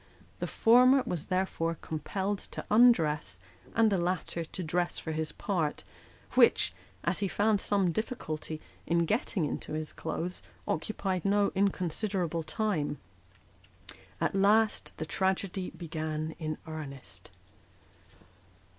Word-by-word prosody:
The - - -2
former 250 +3 +6
was 170 -4 -3
therefore 185 -3 0
compelled 190 +6 -2
to - - -5
undress, 160 - +4 0.4
and 225 -1 +5
the 195 - +2
latter 175 -1 -1
to 180 +3 -6
dress 175 +2 0
for 160 - -4
his 155 -1 -2
part; 165 -4 -1 0.5
which, - - +5 0.3
as 170 +2 0
he 200 - +1
found 205 +2 +2
some 195 -4 +2
difficulty 160 -7 -4 0.3
in 170 0 +3
getting 205 -3 0
into 150 - -4
his 155 0 -3
clothes, 165 +2 -4 0.3
occupied 185 +1 -1
no 200 0 +3
inconsiderable 185 -2 0
time. 160 -5 -1 1.2
At - - +1
last, 210 +3 +3
the 155 - -3
tragedy 190 +1 -1
began 155 -1 -4
in 155 -2 -3
real 160 0 -6
earnest. 140 -3 -10
180 Hz, 120 wpm, -30 LUFS, 155-200 Hz, 1.2 s, former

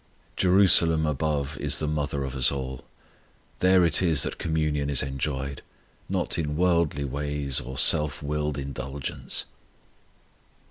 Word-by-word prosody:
Jerusalem 90 -4 +5
above 75 -1 -2
is - - +1
the 75 - -3
mother 75 -2 -2
of 65 0 -5
us 65 -2 +3
all. 65 -2 -5 0.8
There 90 -1 +4
it 80 0 +3
is 80 -6 +3
that - - -4
communion 75 -3 -1
is 70 -2 +2
enjoyed, 70 0 -4 0.5
not 90 -2 0
in 75 -2 -2
worldly 85 -5 +1
ways 70 0 -2
or 65 +1 -8
self 75 +3 +3
willed 75 0 -2
indulgence. 70 0 -5
75 Hz, 130 wpm, -25 LUFS, 70-80 Hz, 0.8 s, Jerusalem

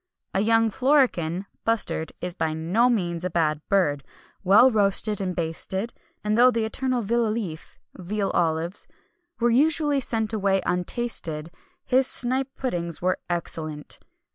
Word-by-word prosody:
A 190 - +1
young 225 +1 +3
florican 240 - +1 0.2
(bustard) 225 -8 0
is 180 -1 -3
by 160 -2 -2
no 185 +10 +2
means 175 -7 -1
a 180 - -1
bad 155 -3 0
bird, 145 -8 +2 0.4
well 210 +7 +6
roasted 205 -1 +2
and 185 -2 -2
basted; 185 +6 -2 0.3
and 210 0 +1
though 245 +2 +6
the 230 -2 0
eternal 255 +1 -1
vilolif 215 -6 -2 0.2
(veal 195 +2 -2
olives) 165 +2 0 0.5
were 240 0 +3
usually 295 +2 +3
sent 225 -3 0
away 195 -2 +2
untasted, 175 -5 -2 0.3
his 260 +1 +3
snipe 260 +2 +1
puddings 170 -10 -3
were 185 +1 0
excellent. 155 -3 -4
200 Hz, 135 wpm, -25 LUFS, 170-235 Hz, 0.5 s, well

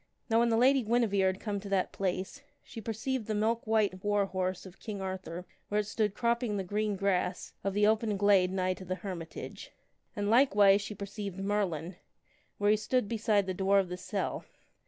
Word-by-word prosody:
Now 225 - +5
when 235 0 +3
the 225 - +2
Lady 265 +3 +5
Guinevere 215 -4 +2
had 190 +1 -1
come 205 -2 -3
to 200 0 -8
that 195 -2 +1
place, 190 +7 -3 0.2
she 225 - -9
perceived 225 +2 -3
the 215 - -1
milk 225 +2 0
white 210 -4 +1
war 205 -1 +2
horse 185 -1 -3
of 185 -1 -13
King 210 -3 -6
Arthur 185 -2 -5 0.2
where 210 +1 +1
it - - -7
stood 210 0 -1
cropping 235 -3 0
the 195 - -1
green 210 +2 -1
grass 190 -2 -1
of 195 0 -1
the 205 0 +4
open 215 -1 +2
glade 195 -2 +4
nigh 185 -1 0
to 185 - -10
the 185 +1 -2
hermitage. 170 -4 -7 0.4
And 205 -2 -1
likewise 205 -5 +5
she 205 +1 -6
perceived 200 -1 -6
Merlin, 190 -4 -2 0.6
where 205 0 +3
he 215 - +4
stood 215 +2 0
beside 215 -3 +1
the 185 - -2
door 195 +2 +2
of 190 -2 +2
the 180 - -3
cell. 190 +2 -3
205 Hz, 200 wpm, -31 LUFS, 190-215 Hz, 0.6 s, Now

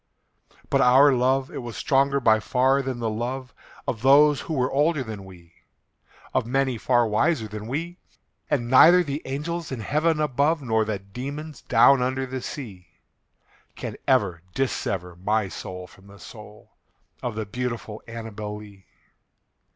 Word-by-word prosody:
But - - +3
our 135 +3 +6
love 130 +1 +1
it - - -6
was 120 -2 -7
stronger 140 -1 +2
by 110 -4 +4
far 130 +4 +2
than 130 -2 -4
the 115 -1 -2
love 125 +2 -4 0.3
Of 110 - -2
those 140 +2 +5
who 160 - -4
were 130 -2 0
older 145 +1 +1
than 110 -4 -7
we 85 -3 -15 0.8
Of - - 0
many 130 -2 0
far 120 0 +2
wiser 110 +3 +1
than 105 +1 -7
we 165 +8 -4 0.5
And 125 -5 0
neither 170 +8 +7
the 145 -1 -4
angels 155 +5 -4
in 125 -4 -4
heaven 155 +7 +1
above, 150 +2 +1
Nor 110 -3 +1
the 105 -1 -2
demons 135 +10 -8
down 125 +3 +5
under 130 +1 -1
the 130 0 -5
sea, 100 - -8 0.9
Can - - -6
ever 100 -10 +2
dissever 95 -9 -2
my 105 +2 0
soul 90 0 -7
from 95 +2 -18
the 100 0 -14
soul 105 0 -13 0.5
Of 120 -3 -4
the 110 -1 -3
beautiful 115 -1 -5
ANNABEL 110 -2 -6
LEE. 100 -4 -14
125 Hz, 155 wpm, -24 LUFS, 105-140 Hz, 0.9 s, neither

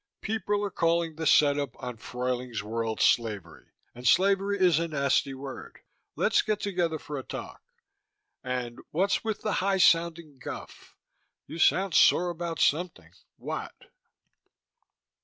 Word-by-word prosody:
People 205 -1 -1
are 200 - -4
calling 165 -2 0
the 160 0 -2
setup 145 -3 +3
on 125 -2 -6
Fruyling's 125 -2 -4
World 110 0 -3
slavery, 105 -9 0 0.3
and 125 +1 -5
slavery 200 +3 +3
is 175 -4 +4
a 170 - -1
nasty 140 -2 0
word. 135 0 -9 0.4
Let's - - +3
get 215 -1 -1
together 180 -6 -1
for 145 -1 -6
a - - -7
talk - - -8 0.8
and 125 -2 -4
what's 190 +5 0
with 220 -2 -3
the 215 - 0
high 195 0 +1
sounding 165 -5 +2
guff? - - -9 0.5
You 165 - -8
sound 190 +2 +3
sore 175 +3 +5
about 170 -2 -5
something: 175 +5 0 0.3
what? - - -6
160 Hz, 135 wpm, -28 LUFS, 125-185 Hz, 0.8 s, sore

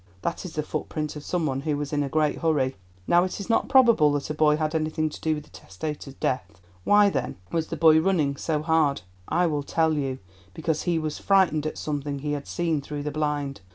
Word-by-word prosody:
That 170 - -3
is 180 - -7
the 150 - -2
footprint 155 0 -4
of 150 - -7
some 175 0 -1
one 135 -2 -1
who 150 0 -1
was 145 0 -4
in 145 - +1
a 140 - -2
great 155 +1 +1
hurry. 145 -6 +1 0.3
Now 175 - +4
it 185 - -3
is 200 +4 -3
not 230 - +1
probable 235 - +6
that 145 +1 -2
a - - -1
boy 150 0 +3
had 155 0 -1
anything 155 0 0
to - - -10
do 160 -1 +1
with 150 - -6
the - - -22
testator's 140 +7 -7
death. 100 -10 -3 0.2
Why, 205 - +5
then, - - -2 0.2
was 165 -1 -1
the - - -5
boy 160 -1 +6
running 160 -6 +1
so 150 +1 -2
hard? 155 - +2 0.2
I 180 +1 +2
will 150 -3 0
tell 160 +2 +1
you: 135 -3 -2 0.4
because 160 -2 -1
he 170 - +2
was 155 -1 -3
frightened 180 -6 +3
at - - -5
something 145 -1 -3
he 145 +2 -3
had 145 -1 -4
seen 165 -4 -1
through 145 +1 -5
the 150 - -3
blind. 145 -4 -2
155 Hz, 230 wpm, -25 LUFS, 145-160 Hz, 0.4 s, probable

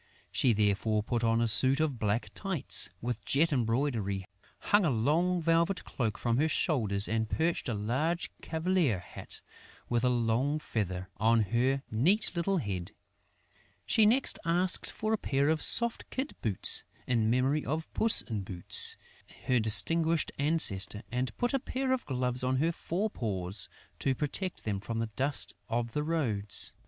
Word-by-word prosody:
She 125 - +2
therefore 105 0 +1
put 120 +1 -2
on 115 0 +2
a 115 - +2
suit 130 +5 +4
of 150 -6 -1
black 105 +2 -1
tights, 190 -8 0
with 120 -1 -3
jet 155 +3 +3
embroidery, 115 -6 -1 0.3
hung 205 0 +2
a 170 - +2
long 160 +9 +1
velvet 170 +3 +1
cloak 110 -5 -3
from 120 -1 -1
her 155 +4 +2
shoulders 110 - +1
and 110 0 -1
perched 165 -4 -1
a 115 - -2
large 135 +12 -2
cavalier 160 - 0
hat, 90 - -8 0.5
with 120 0 0
a 125 - +3
long 120 +4 0
feather, 95 - -4
on 115 +3 +3
her 130 +6 0
neat 165 - +3
little 185 +3 0
head. 95 - -4 0.9
She 215 -1 +4
next 255 +5 +2
asked 175 +2 +2
for 215 +1 -3
a 220 - 0
pair 140 +2 0
of 160 0 +1
soft 235 -1 +3
kid 265 +3 -4
boots, 105 -5 +2 0.2
in 115 -3 +1
memory 130 +5 +1
of 155 +4 -4
Puss 225 0 +2
in 110 -4 -4
Boots, 90 -2 +2 0.5
her 125 -1 +2
distinguished 160 +9 +5
ancestor, 125 -9 +1
and 125 +1 -3
put 245 +2 -1
a 270 - +2
pair 260 0 -2
of 260 - -3
gloves 125 -2 -2
on 130 +1 0
her 160 +6 +1
fore 190 +5 -3
paws, 95 -3 -3 0.3
to 135 -1 0
protect 165 +7 -4
them 100 -3 -2
from 115 +3 -5
the 115 -1 -3
dust 140 +2 -1 0.2
of 115 0 -2
the 150 - -1
roads. 115 -11 0
130 Hz, 165 wpm, -30 LUFS, 110-165 Hz, 0.9 s, distinguished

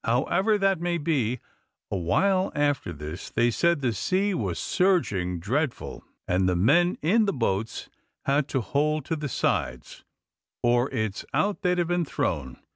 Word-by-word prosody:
However 180 - +2
that 195 -3 +1
may 175 0 0
be, 135 -7 0 0.5
a - - -1
while 185 - +1
after 145 -10 0
this 75 +2 -7
they 120 0 +2
said 170 +4 +2
the 125 -4 +1
sea 190 - 0
was - - -2
surging 105 - +1
dreadful, 130 - -2 0.2
and 90 +1 +2
the 90 - +1
men 155 - +3
in 215 +8 +4
the 200 - +1
boats 115 - -2 0.4
had 140 +1 +2
to 135 - -1
hold 150 +6 0
to 165 - -1
the 150 -2 -4
sides, - - -2 0.6
or 120 +2 +3
it's 110 -6 -2
out 205 0 +1
they'd 180 -2 +1
have 175 -1 +1
been 175 0 +1
thrown. 70 - -2
140 Hz, 160 wpm, -26 LUFS, 105-175 Hz, 0.6 s, in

